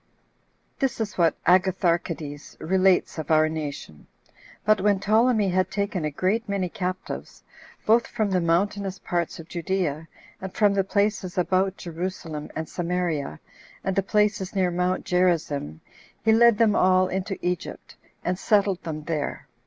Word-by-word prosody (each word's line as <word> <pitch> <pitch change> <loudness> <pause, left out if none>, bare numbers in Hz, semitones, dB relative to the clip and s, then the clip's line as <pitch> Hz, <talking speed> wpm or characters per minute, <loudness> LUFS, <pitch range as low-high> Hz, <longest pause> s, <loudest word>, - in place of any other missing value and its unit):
This 270 -4 0
is 215 -2 -3
what 165 -3 +2
Agatharchides 170 -5 +1
relates 185 0 +2
of 155 - -5
our 155 0 +5
nation. 145 - -6 0.6
But 215 -2 +4
when 200 -1 +3
Ptolemy 215 0 +3
had 185 0 +1
taken 200 -5 -2
a - - 0
great 190 +9 -1
many 195 -3 -1
captives, 185 +1 -5 0.4
both 230 +2 +4
from 215 -2 -1
the 185 -1 +2
mountainous 195 +3 0
parts 170 -2 -2
of 165 - -10
Judea, 170 -3 -2 0.3
and 190 0 -5
from 205 -2 +4
the 195 -1 +2
places 200 -2 -1
about 190 +2 +1
Jerusalem 165 -3 -5
and 160 0 -3
Samaria, 170 - -2 0.4
and 190 - -1
the 195 - +3
places 205 -1 0
near 185 -2 +2
Mount 180 +1 -1
Gerizzim, 160 - 0 0.4
he 220 - +5
led 235 0 +6
them 220 -2 +4
all 185 -1 +4
into 190 +2 -3
Egypt, 180 -1 -4 0.3
2 - - -1
and 180 0 -1
settled 200 -3 +2
them 155 -3 -5
there. 150 -2 -3
185 Hz, 150 wpm, -25 LUFS, 165-200 Hz, 0.6 s, led